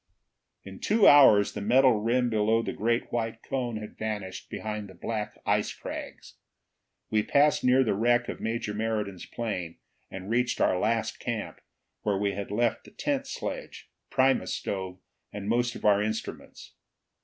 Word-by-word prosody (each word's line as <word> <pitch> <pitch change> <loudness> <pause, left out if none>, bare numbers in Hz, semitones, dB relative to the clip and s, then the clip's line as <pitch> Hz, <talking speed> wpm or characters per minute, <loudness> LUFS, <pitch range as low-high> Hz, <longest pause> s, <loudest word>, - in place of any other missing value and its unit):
In 95 -1 -10
two 215 0 +4
hours 110 -8 +7
the - - -5
metal 125 +2 +4
rim 120 +2 +1
below 110 +1 +2
the - - -3
great 115 +3 -1
white 115 -1 -3
cone 125 -4 -2
had 105 0 -9
vanished 105 -4 -4
behind 105 -2 -5
the 95 - -13
black 105 +2 -4
ice 105 0 +1
crags. - - -8 0.7
We 110 -1 +3
passed 145 +7 +3
near 125 +1 +5
the 115 - +1
wreck 120 +4 +2
of - - -5
Major 110 -2 -2
Meriden's 105 -4 -3
plane 90 -8 -4 0.3
and 95 0 -8
reached 120 +2 0
our 90 - +2
last 110 +2 0
camp, 115 -4 -4 0.4
where 100 -2 0
we 100 0 0
had 100 0 -5
left 115 +3 0
the - - -13
tent 280 -2 -2
sledge, - - -6 0.2
primus 135 0 +2
stove, 95 -2 -4 0.3
and 100 -1 -6
most 120 +2 +1
of - - -8
our 100 -1 +5
instruments. 110 +1 -5
110 Hz, 160 wpm, -28 LUFS, 105-120 Hz, 0.7 s, hours